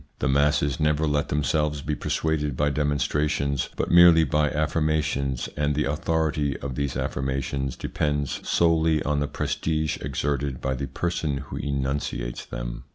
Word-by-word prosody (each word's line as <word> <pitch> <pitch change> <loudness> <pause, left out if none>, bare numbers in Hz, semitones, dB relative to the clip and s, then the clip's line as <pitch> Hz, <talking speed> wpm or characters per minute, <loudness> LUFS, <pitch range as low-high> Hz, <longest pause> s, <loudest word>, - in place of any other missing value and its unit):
The - - -1
masses 70 0 +2
never 75 0 +2
let 75 -1 0
them 75 0 0
selves 75 0 0
be 75 - -1
persuaded 75 -3 -1
by 75 0 +2
demonstrations, 70 -1 0
but - - -2
merely 85 -2 +8
by 75 0 +2
affirmations, 75 -4 0
and 75 -1 0
the 75 - +1
authority 75 -1 0
of 65 0 -5
"these 70 0 -2
affirmations 65 0 -2
depends 75 -2 -2
solely 80 -2 +2
on 75 0 0
the 70 - 0
prestige 75 +1 -1
exerted 70 0 -2
by 65 - -1
the 70 +1 -3
person 80 -4 -2
who 70 -1 -7
enunciates 70 -3 -3
them. - - -6
75 Hz, 150 wpm, -25 LUFS, 70-75 Hz, -, merely